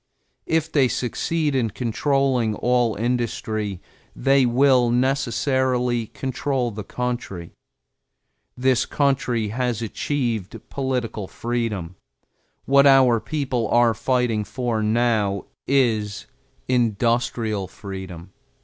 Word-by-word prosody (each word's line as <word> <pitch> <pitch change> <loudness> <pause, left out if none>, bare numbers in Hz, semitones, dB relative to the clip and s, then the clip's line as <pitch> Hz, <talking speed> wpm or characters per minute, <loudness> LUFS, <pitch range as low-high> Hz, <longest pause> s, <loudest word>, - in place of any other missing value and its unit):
If 160 0 0
they 135 -4 +4
succeed 150 +5 -1
in 125 -4 +1
controlling 125 0 0
all 120 -2 +1
industry, 110 -4 -2 0.4
they 135 -2 +3
will 125 0 +4
necessarily 125 -1 +1
control 130 -1 -2
the 105 0 -6
country. 120 -7 -4 1.1
This 130 -1 +2
country 130 -6 0
has 120 0 -1
achieved 115 -3 -2
political 125 -7 -2
freedom; 110 -8 -3 0.7
what 140 +1 +5
our 130 -4 +6
people 130 -5 -2
are 120 -1 +4
fighting 120 -1 0
for 120 0 -2
now 110 -3 +1 0.2
is 110 -7 +1 0.4
industrial 115 -3 0
freedom. 95 -2 -9
120 Hz, 95 wpm, -23 LUFS, 110-130 Hz, 1.1 s, our